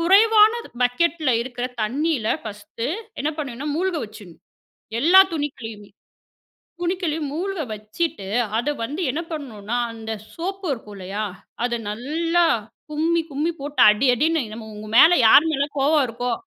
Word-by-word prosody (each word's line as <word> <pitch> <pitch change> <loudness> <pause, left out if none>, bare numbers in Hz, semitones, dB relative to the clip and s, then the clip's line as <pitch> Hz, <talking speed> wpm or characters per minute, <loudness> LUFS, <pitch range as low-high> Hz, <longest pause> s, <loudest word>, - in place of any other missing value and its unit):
குறைவான 425 +5 +6 0.3
பக்கெட்ல 300 +4 +1
இருக்கிற 245 0 -5 0.2
தண்ணில 275 +1 -1 0.2
ஃபர்ஸ்டு 210 +2 -6 0.3
என்ன 295 - 0
பண்ணனும், 285 0 -4
மூழ்க 365 0 0
வச்சுரணும், 205 -5 -13 0.6
எல்லா 355 +7 +7
துணிகளையுமே. 225 -9 -5 0.9
துணிக்களையும் 340 -5 -2
மூழ்க 375 +4 -3
வச்சிட்டு, 215 - -4 0.3
அத 240 +5 -1 0.2
வந்து 295 +9 -4
என்ன 295 +6 -2
பண்ணனும்னா 240 -7 -5 0.2
அந்த 225 -1 -8 0.2
சோப்பு 385 +3 -5
இருக்கும் 215 -5 -8
இல்லையா? 195 +3 -4 0.4
அத 240 -1 0
நல்லா 330 +10 0 0.5
கும்மி 325 +3 +1
கும்மி 295 +4 -1
போட்டு 290 +1 -3
அடி, 215 +6 +1
அடின்னு 315 +4 +1
நம்ம 220 -1 -9
உங்க 210 +1 -9
மேல, 320 - +9 0.2
யாரு 290 - +8
மேல 280 -1 +1
கோவம் 290 +1 +3
இருக்கோ? 245 +2 -3
285 Hz, 130 wpm, -22 LUFS, 225-330 Hz, 0.9 s, மேல